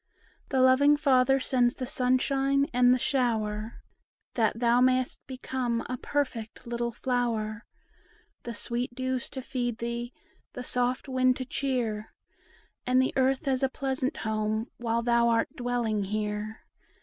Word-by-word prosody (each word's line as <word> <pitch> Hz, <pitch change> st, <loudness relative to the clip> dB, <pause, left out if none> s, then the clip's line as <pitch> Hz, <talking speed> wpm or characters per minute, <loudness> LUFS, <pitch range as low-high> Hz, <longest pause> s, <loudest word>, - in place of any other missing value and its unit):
The 265 Hz, -2 st, +2 dB
loving 275 Hz, +3 st, +5 dB
Father 270 Hz, -2 st, +4 dB
sends 250 Hz, -2 st, +1 dB
the 255 Hz, -, -4 dB
sunshine 270 Hz, +1 st, +2 dB
and 245 Hz, 0 st, +5 dB
the 255 Hz, -, +5 dB
shower, 225 Hz, -5 st, -1 dB, 0.5 s
That 225 Hz, -2 st, +1 dB
thou 240 Hz, +1 st, +3 dB
mayst 255 Hz, 0 st, +2 dB
become 255 Hz, -2 st, -2 dB
a 255 Hz, -, -3 dB
perfect 255 Hz, -5 st, -3 dB
little 235 Hz, 0 st, -2 dB
flower;— 230 Hz, -3 st, -2 dB, 0.7 s
The 235 Hz, -1 st, -6 dB
sweet 240 Hz, +3 st, -3 dB
dews 260 Hz, 0 st, -2 dB
to 260 Hz, -, -7 dB
feed 245 Hz, -3 st, -2 dB
thee, 235 Hz, +1 st, -4 dB, 0.4 s
the 250 Hz, -, -6 dB
soft 250 Hz, +2 st, 0 dB
wind 255 Hz, -1 st, +3 dB
to 255 Hz, -, -4 dB
cheer, 240 Hz, -6 st, -2 dB, 0.7 s
And 255 Hz, 0 st, +4 dB
the 260 Hz, -, +2 dB
earth 265 Hz, +2 st, +1 dB
as 260 Hz, -1 st, +1 dB
a 270 Hz, -, +2 dB
pleasant 265 Hz, +1 st, -2 dB
home, 215 Hz, +1 st, -1 dB
while 235 Hz, 0 st, -1 dB
thou 235 Hz, 0 st, +3 dB
art 230 Hz, -1 st, +1 dB
dwelling 240 Hz, -4 st, -1 dB
here. 210 Hz, +1 st, -3 dB
245 Hz, 140 wpm, -28 LUFS, 230-260 Hz, 0.7 s, loving